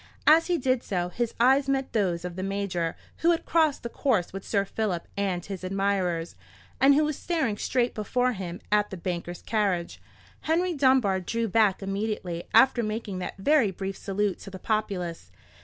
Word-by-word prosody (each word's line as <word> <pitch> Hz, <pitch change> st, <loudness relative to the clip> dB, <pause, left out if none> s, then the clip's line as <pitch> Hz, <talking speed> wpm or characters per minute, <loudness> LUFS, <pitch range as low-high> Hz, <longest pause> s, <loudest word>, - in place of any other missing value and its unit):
As 320 Hz, +2 st, +6 dB
he 355 Hz, -1 st, +2 dB
did 255 Hz, -3 st, +1 dB
so, 180 Hz, -2 st, -2 dB
his 235 Hz, +5 st, -3 dB
eyes 265 Hz, +3 st, +4 dB
met 270 Hz, -1 st, -1 dB
those 180 Hz, -5 st, 0 dB
of 175 Hz, -1 st, -5 dB
the 185 Hz, -, -4 dB
Major, 190 Hz, -4 st, -2 dB, 0.2 s
who 335 Hz, -, +2 dB
had 335 Hz, -1 st, +1 dB
crossed 315 Hz, -3 st, +2 dB
the -, -, -2 dB
course 230 Hz, -8 st, 0 dB
with 195 Hz, 0 st, -6 dB
Sir 200 Hz, -2 st, 0 dB
Philip 195 Hz, -4 st, -2 dB
and 190 Hz, -3 st, -1 dB
his 195 Hz, -2 st, -6 dB
admirers, 185 Hz, -3 st, -1 dB, 0.5 s
and 275 Hz, +1 st, +6 dB
who 305 Hz, -, +4 dB
was 305 Hz, -1 st, -1 dB
staring 320 Hz, -12 st, -1 dB
straight 245 Hz, +3 st, 0 dB
before 250 Hz, +4 st, 0 dB
him 180 Hz, -4 st, -6 dB
at 210 Hz, 0 st, +3 dB
the 190 Hz, -, -6 dB
banker's 175 Hz, 0 st, -5 dB
carriage. 200 Hz, -6 st, -1 dB, 0.4 s
Henry 350 Hz, +3 st, 0 dB
Dunbar 260 Hz, -, +3 dB
drew 230 Hz, +5 st, -2 dB
back 205 Hz, -2 st, +2 dB
immediately 195 Hz, -3 st, -3 dB
after 260 Hz, -2 st, +5 dB
making 215 Hz, -3 st, -3 dB
that 180 Hz, -, -5 dB
very 260 Hz, +2 st, +3 dB
brief 195 Hz, +1 st, -5 dB
salute 200 Hz, -1 st, -2 dB
to -, -, -9 dB
the 190 Hz, -, -8 dB
populace. 185 Hz, -, -2 dB
205 Hz, 180 wpm, -27 LUFS, 185-255 Hz, 0.5 s, As